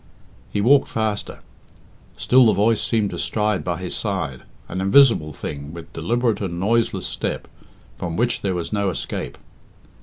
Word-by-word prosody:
He 105 - 0
walked 135 +5 +5
faster. 110 -2 -3 0.8
Still 125 -1 +5
the 110 - +4
voice 105 +3 +2
seemed 110 -4 0
to - - -5
stride 105 -2 0
by 85 -2 -2
his 90 -1 -4
side, 95 - -3 0.3
an 95 +2 -4
invisible 100 - +5
thing, 70 +1 -7
with 85 -1 -10
deliberate 115 +6 0
and 85 -3 -3
noiseless 115 +4 +1
step, - - -3 0.5
from 85 -2 -3
which 120 +1 +1
there 95 -2 -1
was 85 +3 -4
no 100 -2 +1
escape. 90 - -4
100 Hz, 155 wpm, -22 LUFS, 85-115 Hz, 0.8 s, walked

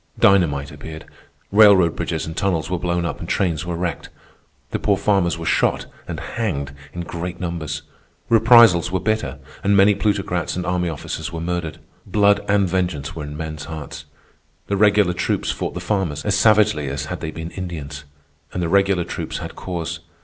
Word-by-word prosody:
Dynamite 75 -8 +3
appeared. 80 0 -9 0.5
Railroad 100 -5 +6
bridges 80 -3 -2
and 80 - -6
tunnels 90 -3 -1
were 90 - 0
blown 85 0 -1
up - - -3
and 85 - -7
trains 85 -4 0
were 85 - -2
wrecked. 85 -2 -3 0.6
The - - -1
poor 100 -2 +2
farmers 95 -5 +1
were 85 - -6
shot - - +1 0.2
and - - -5
hanged 70 -12 -3 0.2
in 85 - -5
great 85 +1 -5
numbers. 85 -4 -4 0.4
Reprisals 115 -7 +6
were 95 - 0
bitter, 110 -12 -1 0.3
and 100 0 +3
many 100 +1 +6
plutocrats 95 -5 -1
and 90 0 -3
army 90 -1 0
officers 80 +1 -5
were 85 - -5
murdered. 85 -1 -3 0.3
Blood 100 -1 +3
and 100 -1 +3
vengeance 90 -5 -2
were 75 -2 -5
in 75 0 -7
men's 80 -2 -5
hearts. 80 -1 -7 0.6
The 100 - -1
regular 100 -2 +4
troops 90 - -1
fought - - -4
the - - -3
farmers 90 -8 -2
as 105 - +2
savagely 105 -8 +4
as 70 +1 -3
had - - -5
they 80 - -3
been 80 +1 -6
Indians. 75 -6 -6 0.5
And 90 - -2
the 85 - -1
regular 95 -1 +3
troops - - -5
had - - -7
cause. 85 -3 -4
90 Hz, 180 wpm, -21 LUFS, 80-100 Hz, 0.6 s, Railroad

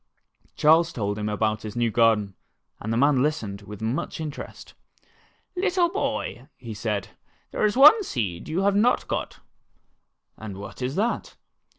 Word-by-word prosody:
Charles 165 +2 +4
told 105 -6 -3
him 105 0 -2
about 110 0 0
his 110 +1 -7
new 120 -1 +1
garden, 110 -3 +3 0.5
and 110 - -4
the 115 - 0
man 140 0 +4
listened 110 -9 -2
with 105 +1 -9
much 115 +8 -2
interest. 155 -2 -7 0.8
''Little 360 -2 +1
boy," 205 - -3 0.3
said 105 -2 -2
he, - - -21 0.4
"there - - 0
is 210 +3 +1
one 300 +11 +8
seed 100 - -3
that - - -6
you 175 +4 0
have 200 0 +2
not 230 +5 +2
got." - - -4 1.0
"And 105 -3 -7
what 100 +5 -9
is 130 +3 -2
that?" 225 +4 -1
120 Hz, 160 wpm, -25 LUFS, -, 1.0 s, one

